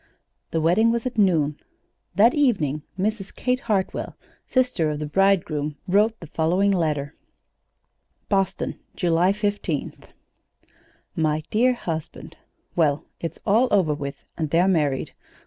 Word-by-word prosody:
The 165 - -1
wedding 175 +8 +3
was 235 0 -1
at 245 -3 -2
noon. 155 -7 +2 0.6
That 220 +6 +6
evening 190 - +1 0.2
Mrs. 195 0 -2
Kate 250 0 0
Hartwell, 205 -7 -2 0.3
sister 250 -11 +1
of 150 - -2
the 150 - -4
bridegroom, 155 -4 +1
wrote 210 +4 +2
the - - -9
following 175 +6 +1
letter: 150 -5 -1 1.1
BOSTON, 195 -2 -1 0.2
July 175 +2 +2
15th. 205 -7 -3 1.1
"MY 155 -1 0
DEAR 250 +4 +3
HUSBAND: 165 -9 -6 0.4
Well, 155 -2 +2
it's 165 - -5
all 225 +6 +4
over 185 -7 +3
with, 140 -1 -6
and 155 -3 -2
they're 170 +4 +3
married. 150 -8 0
180 Hz, 125 wpm, -24 LUFS, 155-210 Hz, 1.1 s, That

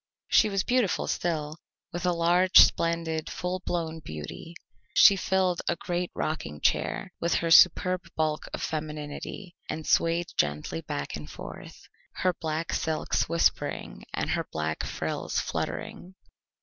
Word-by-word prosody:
She 215 - +5
was 195 -1 0
beautiful 245 -6 +1
still, 155 -3 -2 0.4
with 175 +1 -2
a - - +4
large, 175 +2 +3
splendid, 165 -1 +4
full 180 +1 -3
blown 165 -2 -2
beauty; 135 - -8 0.4
she 200 - +8
filled 185 -2 +1
a 175 - +1
great 175 0 -3
rocking 75 - -3
chair - - 0
with 170 - +1
her 165 -1 0
superb 180 +1 +6
bulk 155 -1 -1
of - - -5
femininity, 155 +4 -5
and 155 -1 -4
swayed 170 +1 +2
gently 75 +2 -1
back 70 -3 -4
and 75 0 -8
forth, - - -10 0.3
her 185 -1 +1
black 160 -1 -3
silks 160 -1 0
whispering 165 - 0
and - - -2
her - - -1
black 80 0 -2
frills - - -3
fluttering. 185 +2 -4
165 Hz, 135 wpm, -27 LUFS, 155-180 Hz, 0.4 s, she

